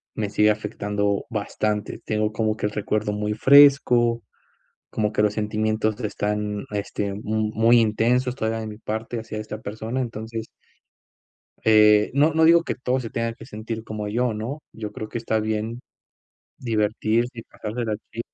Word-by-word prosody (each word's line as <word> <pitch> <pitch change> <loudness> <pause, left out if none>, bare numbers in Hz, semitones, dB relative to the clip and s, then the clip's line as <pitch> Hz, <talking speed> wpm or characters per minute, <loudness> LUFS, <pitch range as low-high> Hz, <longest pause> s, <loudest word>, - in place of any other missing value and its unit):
me 105 -2 -2
sigue 105 0 +4
afectando 105 -1 -1
bastante. 105 -1 -2
Tengo 110 0 0
como 110 0 0
que - - -2
el 105 - 0
recuerdo 105 0 -1
muy 105 +1 -2
fresco, 130 -4 +5 0.7
como 105 0 -1
que 105 - +1
los 105 -1 +2
sentimientos 110 0 -1
están, 105 -1 -2
este, 105 0 -2
m 100 +1 -5
muy 110 +2 +3
intensos 120 +3 +2
todavía 115 -3 -2
de 110 - -5
mi 105 -1 -8
parte 110 +2 -4
hacia 110 -1 -6
esta 105 0 -6
persona. 110 +4 -4
Entonces, 115 -2 -5 1.2
eh, 105 -1 +6
no 150 +3 +4
no 160 0 +4
digo 170 +1 +6
que - - -3
todos 125 +1 -1
se 115 - -6
tengan 115 0 -2
que - - -11
sentir 110 0 -6
como 105 -1 -5
yo, 120 +3 0
¿no?, 120 +8 -5
yo 105 -2 -6
creo 110 - -6
que 115 - -4
está 110 -1 0
bien 110 +2 -2 0.8
divertirse 115 +1 0
y - - -5
pasársela 110 +1 -4
así. 110 +2 -9
110 Hz, 165 wpm, -24 LUFS, 105-115 Hz, 1.2 s, eh